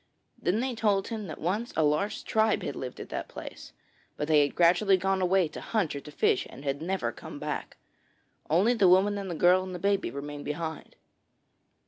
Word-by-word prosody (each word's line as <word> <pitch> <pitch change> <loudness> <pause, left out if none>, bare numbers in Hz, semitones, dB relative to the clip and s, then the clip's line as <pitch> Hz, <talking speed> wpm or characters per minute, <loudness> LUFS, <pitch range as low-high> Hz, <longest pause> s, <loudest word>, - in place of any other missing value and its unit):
Then 195 +6 +1
they 260 0 -1
told 205 -4 +1
him 220 -3 -4
that 155 - -7
once 205 +8 -2
a 160 - +4
large 150 +7 0
tribe 220 0 +1
had 140 - -4
lived 125 -1 -6
at - - -8
that - - -4
place, - - -9 0.5
but 150 - -2
they 155 -2 +5
had 145 - 0
gradually 180 +3 +4
gone 190 +1 0
away 185 -1 +3
to - - -8
hunt 200 -10 -1
or - - -3
to 150 - -12
fish 130 - +1
and 135 - -11
had 140 +1 -2
never 190 +3 -1
come - - -10
back. - - -5 0.7
Only 190 +10 +4
the 205 -6 +4
woman 200 +3 +4
and 195 -1 -5
the 170 - -3
girl 180 +3 +5
and 185 -1 -6
the - - -3
baby 200 +2 0
remained 145 +1 -7
behind. 160 +1 -5
185 Hz, 205 wpm, -28 LUFS, 155-200 Hz, 0.7 s, they